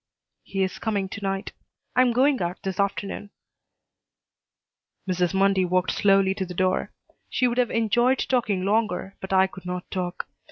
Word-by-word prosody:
"He 195 -1 -2
is 190 - -3
coming 200 -4 -1
to 200 - -7
night. 195 0 -2 0.4
I 255 - +6
am 250 -1 +4
going 260 +1 +3
out 175 +1 -3
this 190 0 -4
afternoon." 200 +1 -2 1.8
Mrs. 180 -1 +1
Mundy 195 -1 +3
walked 180 0 +1
slowly 195 -1 +3
to 195 - -3
the 180 - -7
door. 185 +1 0 0.4
She 255 - +2
would 240 +1 -1
have 245 - +2
enjoyed 240 +3 +2
talking 215 -9 0
longer, 200 -2 0
but 190 - -6
I 190 0 +5
could 185 -1 -9
not 180 0 -5
talk. 180 -2 -3
195 Hz, 165 wpm, -25 LUFS, 185-220 Hz, 1.8 s, I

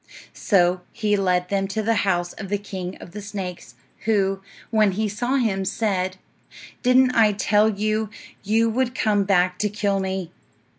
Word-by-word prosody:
So 180 -2 +2
he 210 -2 0
led 180 -2 +1
them 195 -1 0
to 215 +3 -2
the 230 +2 +2 0.2
house 175 -1 0
of 195 -3 -8
the 205 - +1
king 190 -3 -6
of - - -11
the 210 +3 -7
snakes, 185 - -7 0.3
who, 195 -3 +1 0.3
when 215 -3 +3
he 215 +3 0
saw 240 +6 -1
him, 215 -7 +1
said, 190 -2 -1 0.6
"Didn't 255 0 +4
I 220 -3 +4
tell 210 +1 +3
you 215 +1 -1 0.3
you 220 +3 +2
would 250 +2 0
come 205 -4 +1
back 180 -2 +2
to 210 - +1
kill 200 -1 0
me?" 190 -2 -3
200 Hz, 165 wpm, -23 LUFS, 190-215 Hz, 0.6 s, Didn't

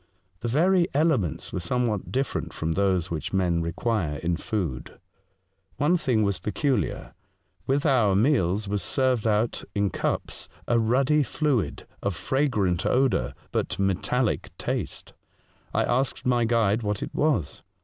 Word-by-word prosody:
The 120 - -3
very 170 +8 +3
elements 140 - +1
were - - -1
somewhat 110 +2 -1
different 135 +1 -2
from 80 +1 -2
those 95 -1 +1
which 80 +2 -4
men 90 -3 +2
require 85 -1 -1
in 85 +3 -1
food. 85 - -4 0.8
One 150 +5 +3
thing 130 -10 +1
was 100 -3 0
peculiar. 120 - -1 0.5
With 140 +2 +1
the 120 -10 +3
meals 105 - +2
was 100 0 -1
served 125 +4 +1
out 110 +2 +1
in 100 -2 +1
cups - - -3 0.2
a 120 -1 +3
ruddy 135 +7 +3
fluid 140 -2 -1 0.2
of 100 -3 -1
fragrant 120 - 0
odour 130 0 +1 0.2
but 90 - -1
metallic 100 +5 0
taste. - - -4 0.6
I - - +1
asked 130 +2 0
my 120 -2 +3
guide 115 -2 +2
what 105 -2 -2
it - - -6
was. 145 - 0
110 Hz, 140 wpm, -26 LUFS, 95-130 Hz, 0.8 s, very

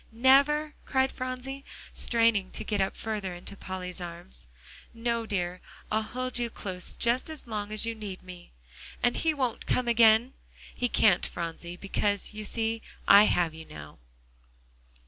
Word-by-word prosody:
"Never?" 280 +6 +4
cried 265 -1 +1
Phronsie, 255 +2 -5 0.3
straining 230 -5 +2
to - - -3
get 205 -2 0
up 190 - -1
further 205 -5 -3
into 175 +3 -6
Polly's 185 -2 -6
arms. 65 - -6 0.5
"No 230 0 -1
dear; 180 -3 -2 0.3
I'll 215 +1 +2
hold 255 +3 -2
you 240 -1 -1
close 185 -4 -1
just 240 +5 +1
as 315 -2 -8
long 210 -3 -4
as 215 +1 +2
you 230 - -2
need 205 -4 -7
me." 180 -1 -11 0.5
"And 245 - +3
he 325 - +2
won't 255 -5 -2
come 250 -1 +1
again?" 230 +2 +5 0.4
"He 245 - -1
can't 195 -6 +4
Phronsie; 170 +1 -5
because, 205 +1 -1
you 215 0 -6
see, 225 +1 -1 0.3
I 205 +1 +9
have 170 -5 +2
you 160 0 -9
now." 75 - -11
220 Hz, 155 wpm, -28 LUFS, 185-245 Hz, 0.5 s, I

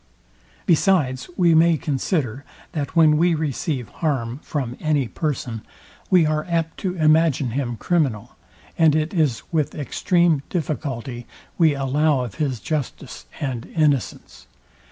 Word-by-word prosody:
Besides 160 -7 +2
we 175 -2 +4
may 165 0 +5
consider, 140 - -2 0.3
that 150 0 -4
when 155 -2 +5
we 170 +1 +3
receive 145 - -2
harm 135 -6 -2
from 130 -6 -4
any 150 -5 +1
person, 125 -6 -3 0.5
we 180 -4 +5
are 155 0 0
apt 165 -1 -1
to 185 -2 -2
imagine 155 -5 +3
him 120 -1 -2
criminal, 130 - -1 0.4
and 160 -2 +5
it 155 +3 0
is 150 -10 +1
with 155 -3 0
extreme 165 +2 +1
difficulty 130 -7 -4 0.3
we 160 -4 +4
allow 140 +1 +1
of 120 -5 -5
his 135 -6 -1
justice 140 - -5
and 130 -5 -4
innocence. 145 - -1
150 Hz, 130 wpm, -22 LUFS, 130-160 Hz, 0.5 s, may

